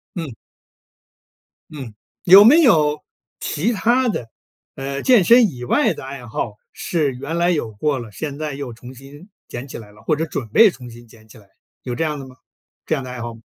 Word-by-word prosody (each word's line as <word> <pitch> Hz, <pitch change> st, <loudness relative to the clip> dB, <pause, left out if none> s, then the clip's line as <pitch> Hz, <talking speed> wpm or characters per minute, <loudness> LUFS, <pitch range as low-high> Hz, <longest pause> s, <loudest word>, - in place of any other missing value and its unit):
嗯。 160 Hz, -9 st, -5 dB, 1.4 s
嗯， 130 Hz, -8 st, -9 dB, 0.3 s
有 190 Hz, +3 st, +9 dB
没 290 Hz, +10 st, +7 dB
有 155 Hz, -, +3 dB, 0.4 s
其 170 Hz, +10 st, -1 dB
他 240 Hz, +5 st, +2 dB
的， 125 Hz, -, -3 dB, 0.5 s
呃， 140 Hz, +1 st, -4 dB
健 245 Hz, -7 st, +5 dB
身 235 Hz, +3 st, +6 dB
以 125 Hz, -2 st, -9 dB
外 120 Hz, -, +2 dB
的 -, -, -10 dB
爱 135 Hz, -2 st, -8 dB
好 105 Hz, -1 st, -4 dB, 0.2 s
是 155 Hz, -5 st, -1 dB
原 140 Hz, +6 st, -5 dB
来 170 Hz, +1 st, +2 dB
有 150 Hz, -10 st, -1 dB
过 140 Hz, +7 st, -1 dB
了， 115 Hz, -3 st, -8 dB
现 145 Hz, +5 st, -6 dB
在 155 Hz, -1 st, -4 dB
又 135 Hz, -2 st, -6 dB
重 120 Hz, +2 st, -12 dB
新 140 Hz, -, -14 dB, 0.2 s
捡 120 Hz, +3 st, -7 dB
起 -, -, -8 dB
来 105 Hz, -3 st, -12 dB
了， 105 Hz, +1 st, -19 dB
或 155 Hz, -, +1 dB
者 160 Hz, +2 st, -2 dB
准 140 Hz, -6 st, -5 dB
备 220 Hz, -, +6 dB
重 125 Hz, -7 st, -11 dB
新 120 Hz, +1 st, -14 dB
捡 110 Hz, -1 st, -19 dB
起 110 Hz, -, -16 dB
来， 100 Hz, -, -21 dB, 0.4 s
有 125 Hz, -2 st, -4 dB
这 165 Hz, -, -1 dB
样 150 Hz, -2 st, -2 dB
的 135 Hz, -, -9 dB
吗 130 Hz, -, -15 dB, 0.5 s
这 -, -, -1 dB
样 140 Hz, -4 st, -2 dB
的 130 Hz, -, -8 dB
爱 125 Hz, -1 st, -7 dB
好 120 Hz, 0 st, -5 dB
吗？ 115 Hz, -, -15 dB
140 Hz, 225 characters per minute, -20 LUFS, 120-165 Hz, 1.4 s, 有